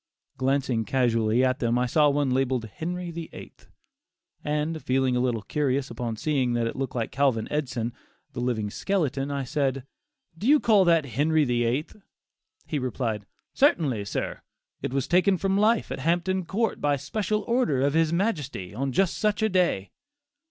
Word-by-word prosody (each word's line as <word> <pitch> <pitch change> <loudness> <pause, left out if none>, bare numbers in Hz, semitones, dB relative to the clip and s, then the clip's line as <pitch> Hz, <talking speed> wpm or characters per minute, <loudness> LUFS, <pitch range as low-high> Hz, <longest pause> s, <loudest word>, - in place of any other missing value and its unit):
Glancing 130 -3 0
casually 115 0 +2
at 130 0 0
them, 120 0 +1
I 125 - +2
saw 150 +4 +4
one 140 -2 +1
labelled 130 -2 0
"Henry 175 - -5
VIII.," 165 -1 -8 0.9
and 150 +2 -1
feeling 130 -1 +1
a - - +1
little 120 -4 0
curious 140 0 -1
upon 115 -1 -3
seeing 130 -1 0
that 120 -1 0
it 115 - -3
looked 130 -1 -4
like 115 -2 -2
Calvin 130 -5 +1
Edson, 125 -6 -2 0.4
the - - -5
living 115 -4 -1
skeleton, 145 - -1
I 140 -1 -2
said: 135 -1 -1 0.5
"Do 200 +8 -4
you 295 +2 +6
call 210 -7 +4
that 165 -3 +4
'Henry 150 +5 +2
the 120 -2 +1
Eighth'?" 135 - -2 0.7
He 150 - -2
replied, 115 -5 -3 0.3
"Certainly, 150 - +2
sir; 100 - -3 0.4
it - - -3
was 135 -1 -1
taken 185 +2 +3
from 195 +1 0
life 215 +3 +2
at - - -4
Hampton 175 +2 0
Court 220 +3 -1
by 145 -1 +2
special 210 +9 -2
order 235 - +1
of 140 0 +2
his 160 0 +2
majesty, 150 - -2
on 135 +5 -2
such 205 - +1
a 220 - +3
day." 180 - +1
140 Hz, 165 wpm, -26 LUFS, 125-170 Hz, 0.9 s, you